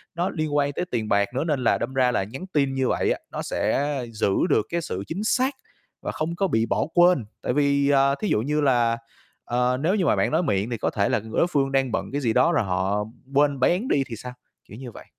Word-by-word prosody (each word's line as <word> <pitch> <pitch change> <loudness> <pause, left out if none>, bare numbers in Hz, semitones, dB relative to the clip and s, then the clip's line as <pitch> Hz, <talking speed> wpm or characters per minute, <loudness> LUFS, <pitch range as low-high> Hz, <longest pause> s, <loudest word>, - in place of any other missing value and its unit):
nó 175 +3 0
liên 155 -2 -3
quan 145 -1 +2
tới 180 - -2
tiền 110 -3 -2
bạc 100 0 +2
nữa, 135 - 0
nên 150 -6 -1
là 115 - +3
đâm 120 +3 -4
ra 130 -2 +3
là 110 - 0
nhắn 125 - -8
tin 140 -3 +1
như 130 -1 0
vậy - - +1
á, - - -1
nó - - -4
sẽ 145 -1 -1
giữ 105 -2 0 0.2
được - - +2
cái 170 0 -1
sự 95 - -4
chính 190 +6 -4
xác 260 +5 +1 0.5
và - - -3
không 160 +2 -3
có 195 +2 +1
bị 110 -9 +1
bỏ - - 0
quên. 175 -8 +4 0.2
Tại - - -1
vì, 140 0 +2
ờ, 140 0 +4
thí 215 - -1
dụ 105 - +2
như 150 +5 0
là, 120 -4 +2 0.5
ờ, 125 +1 +1
nếu 180 +6 +2
như 190 -4 +1
mà - - +3
bạn - - +1
nói 160 +3 +2
miệng 100 - 0
thì 120 - -3
có - - -1
thể 100 -1 0
là - - +1
ng 110 +1 -11
đối - - +3
phương 140 -5 0
đang 135 -2 +1
bận - - -3
cái 145 +2 -2
gì 115 -4 +1
đó 170 - +4
rồi 170 - +2
họ 95 +2 -1 0.3
quên 140 0 +3
béng 180 - +2
đi 140 - +2
thì 115 - -6
sao, 125 +3 -8 0.3
kiểu 105 - -11
như 125 -1 -8
vậy. - - -12
135 Hz, 265 wpm, -24 LUFS, 115-155 Hz, 0.5 s, quên